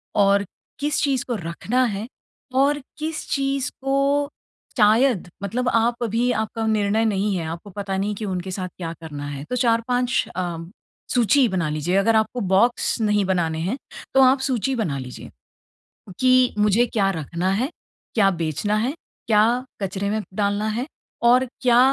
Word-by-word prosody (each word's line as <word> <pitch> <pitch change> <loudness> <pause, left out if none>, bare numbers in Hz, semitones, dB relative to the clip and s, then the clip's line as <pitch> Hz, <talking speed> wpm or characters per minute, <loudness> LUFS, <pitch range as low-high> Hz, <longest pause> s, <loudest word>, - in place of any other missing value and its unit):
और 200 0 +4 0.3
किस 295 +1 0
चीज़ 270 -3 +1
को 245 - -1
रखना 205 +8 -1
है 210 0 -3 0.5
और 280 +2 +3 0.2
किस 315 +1 -4
चीज़ 275 -1 0
को 275 +1 +1 0.5
शायद 220 -1 +4 0.2
मतलब 245 +5 -1
आप 235 +1 +1
अभी 235 +2 +1
आपका 220 0 -2
निर्णय 215 0 +2
नहीं 205 -2 +1
है, 170 - -2
आपको 170 +5 -7
पता 195 0 -4
नहीं 205 +2 -1
कि 215 - -5
उनके 185 -1 -3
साथ 185 0 -3
क्या 165 -2 -4
करना 145 -3 -6
है। 140 -1 -6
तो - - -1
4-5 245 +1 +1
अ, 175 -2 -2 0.6
सूची 245 +2 +4
बना 175 -5 -1
लीजिए। 155 +4 -1
अगर 225 +3 +3
आपको 220 +3 +1 0.2
बॉक्स 235 +3 +2
नहीं 210 -2 +2
बनाने 170 -4 0
हैं, 190 +10 -2 0.4
तो 270 - +6
आप 260 +1 +5
सूची 265 -1 0
बना 170 - -1
लीजिए 125 -1 -8 0.9
कि 255 -1 +4
मुझे 210 +3 +4
क्या 200 -4 +1
रखना 170 +2 -2
है, 235 +7 0 0.5
क्या 200 -4 +4
बेचना 170 +4 -1
है, 235 +5 0 0.3
क्या 230 +3 +3 0.2
कचरे 195 +1 -2
में 215 0 -1
डालना 205 +1 0
है 235 +5 -2 0.4
और 250 +2 +5 0.2
क्या 245 -1 +5
215 Hz, 160 wpm, -23 LUFS, 190-250 Hz, 0.9 s, तो